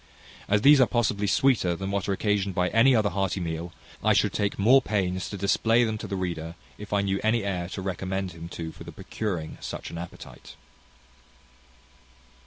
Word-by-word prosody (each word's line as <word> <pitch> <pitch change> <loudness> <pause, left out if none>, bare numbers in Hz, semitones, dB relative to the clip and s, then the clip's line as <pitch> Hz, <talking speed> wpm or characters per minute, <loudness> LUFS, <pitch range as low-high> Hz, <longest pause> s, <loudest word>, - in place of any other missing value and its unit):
As 105 +1 +2
these 145 -1 +7
are 125 - +5
possibly 105 -4 0
sweeter 110 -7 +2
than 95 +3 -4
what 100 0 -2
are - - +2
occasioned 100 -1 0
by 90 -1 +1
any 125 +4 +5
other 105 -3 +2
hearty 95 0 -1
meal, 85 0 -4 0.3
I - - +4
should - - +2
take 100 -1 -1
more 125 +7 +5
pains 95 -5 -1
to 100 - -6
display 115 +5 +2
them 110 -2 -2
to - - -6
the 100 - -3
reader, 85 -3 -4 0.2
if 105 -1 -9
I 100 -1 +2
knew 100 0 -1
any 110 0 +2
air 90 -3 -3
to 95 - -6
recommend 95 0 -3
him 85 0 -9
to 80 -2 -6
for - - -12
the - - -9
procuring 90 -8 -5
such - - -6
an 85 - -6
appetite. 85 0 -10
100 Hz, 195 wpm, -26 LUFS, 90-105 Hz, 0.3 s, these